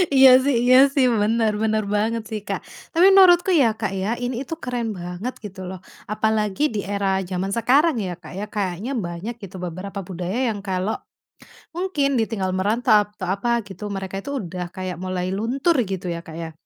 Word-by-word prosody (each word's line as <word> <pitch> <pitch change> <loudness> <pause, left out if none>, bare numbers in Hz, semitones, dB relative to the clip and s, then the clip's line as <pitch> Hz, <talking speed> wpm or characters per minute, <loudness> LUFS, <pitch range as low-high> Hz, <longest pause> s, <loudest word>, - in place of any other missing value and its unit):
iya 265 0 +9
sih 280 +1 +2
iya 250 +1 +6 0.2
sih, 275 -2 +4 0.2
bener 220 +1 +2
bener 220 -1 +1
banget 225 +2 0
sih, 220 -1 -3
Kak, - - -2 0.3
tapi 340 +2 +5
menurutku 370 -1 +6
ya, 250 - +5
Kak, 215 - -1
ya 190 - -1 0.2
ini 245 0 -2
itu 280 - -6
keren 245 -2 -2
banget 180 +8 -5
gitu 200 -2 -8
loh, 185 -1 -7 0.3
apalagi 215 0 0
di 210 - -1
era 200 -1 0 0.2
zaman 190 +1 -2
sekarang 275 +7 +4
ya, 180 - -3
Kak, 160 - -11
ya 205 - -3
kayaknya 200 +4 -2
banyak 175 +7 -5
gitu 195 -1 -9
beberapa 185 +4 -6
budaya 185 +4 -3
yang 205 - -5
kalau 190 +3 -1 0.8
mungkin 350 -6 0
ditinggal 205 -4 -1
merantau 210 +2 +2
atau 185 - -5
apa 200 +4 -3 0.2
gitu 200 +2 -7
mereka 195 0 -4
itu 280 - -7
udah 180 -2 -5
kayak 185 -2 -4
mulai 185 0 -2
luntur 265 - +1
gitu 190 -2 -4
ya, 170 - -4
Kak, 165 -1 -11
ya. 165 -1 -6
210 Hz, 185 wpm, -22 LUFS, 185-240 Hz, 0.8 s, iya